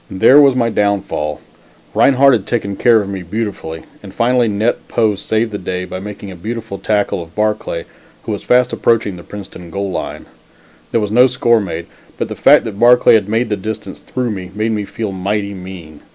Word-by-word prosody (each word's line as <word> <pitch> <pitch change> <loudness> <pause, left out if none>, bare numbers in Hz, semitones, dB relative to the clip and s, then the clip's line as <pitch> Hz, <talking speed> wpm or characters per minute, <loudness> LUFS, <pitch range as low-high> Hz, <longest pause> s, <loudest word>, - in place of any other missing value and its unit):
There 130 +10 +6
was 140 -2 +5
my 120 -2 +2
down 100 -2 +1
fall. 75 -3 -4 0.5
Rinehart 140 0 +5
had 110 -5 0
taken 100 -5 -2
care 115 -1 +4
of 100 - -7
me 95 -2 -4
beautifully, 90 -4 -5 0.2
and 100 - -10
finally, 120 +3 +2
Net 110 +3 -1
Poe 110 -3 +1
saved 110 +3 -1
the 100 - -4
day 90 0 -3
by 95 - -6
making 100 0 -8
a - - -9
beautiful 110 +2 -6
tackle 100 -2 0
of 85 0 -12
Barclay, 105 -6 -1 0.4
who - - -4
was 105 - -3
fast 125 0 +2
approaching 115 -4 +1
the 85 - -10
Princeton 90 -3 -10
goal 100 +2 -3
line. - - -5 0.6
There 115 - +1
was 105 -1 -2
no 125 +4 +6
score 120 -2 +2
made, 85 -4 -4 0.3
but - - -3
the - - -5
fact - - +5
that 105 -2 -6
Barclay 120 +1 +6
had 105 -3 +3
made 115 +3 0
the 105 - +1
distance 105 0 -6
through 125 -2 -3
me, 95 -3 -6
made 110 +2 0
me 105 -2 -2
feel 110 0 -4
mighty 100 +2 -2
mean. 90 -5 -10
105 Hz, 205 wpm, -16 LUFS, 95-115 Hz, 0.6 s, There